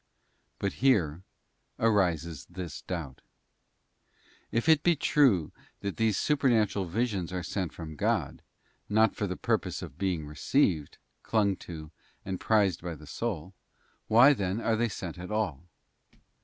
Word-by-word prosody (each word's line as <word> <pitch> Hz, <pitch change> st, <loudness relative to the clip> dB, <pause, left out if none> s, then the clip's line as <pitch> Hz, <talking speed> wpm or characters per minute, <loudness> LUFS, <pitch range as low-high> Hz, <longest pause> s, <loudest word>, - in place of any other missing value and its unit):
But 100 Hz, -, -2 dB
here 90 Hz, -, +3 dB, 0.6 s
arises 85 Hz, -9 st, +1 dB
this 90 Hz, -4 st, -6 dB
doubt; 80 Hz, -8 st, -6 dB, 1.3 s
if 115 Hz, +7 st, 0 dB
it 160 Hz, -2 st, +6 dB
be 175 Hz, 0 st, +3 dB
true 130 Hz, -, +3 dB, 0.3 s
that 100 Hz, -1 st, -4 dB
these 110 Hz, -3 st, +2 dB
super 145 Hz, -3 st, +2 dB
natural 105 Hz, -4 st, +2 dB
visions 100 Hz, -1 st, -1 dB
are 90 Hz, -1 st, -3 dB
sent 90 Hz, 0 st, -3 dB
from 80 Hz, -2 st, -8 dB
God, 100 Hz, -, -1 dB, 0.5 s
not 110 Hz, +1 st, +3 dB
for 105 Hz, -, -1 dB
the 90 Hz, -, -4 dB
purpose -, -, -1 dB
of -, -, -10 dB
being 90 Hz, -5 st, -1 dB
received, 75 Hz, -, 0 dB, 0.2 s
clung 105 Hz, -3 st, +1 dB
to, 80 Hz, -3 st, -9 dB, 0.3 s
and 95 Hz, -1 st, -3 dB
prized 105 Hz, -4 st, +2 dB
by 85 Hz, -1 st, -5 dB
the 75 Hz, 0 st, -13 dB
soul, 95 Hz, +1 st, -4 dB, 0.5 s
why 120 Hz, +6 st, +7 dB
then 100 Hz, -3 st, -2 dB
are 115 Hz, -1 st, +1 dB
they 115 Hz, +1 st, +1 dB
sent 90 Hz, -3 st, -6 dB
at 90 Hz, -, -7 dB
all? 95 Hz, -8 st, -2 dB
95 Hz, 140 wpm, -29 LUFS, 85-110 Hz, 1.3 s, why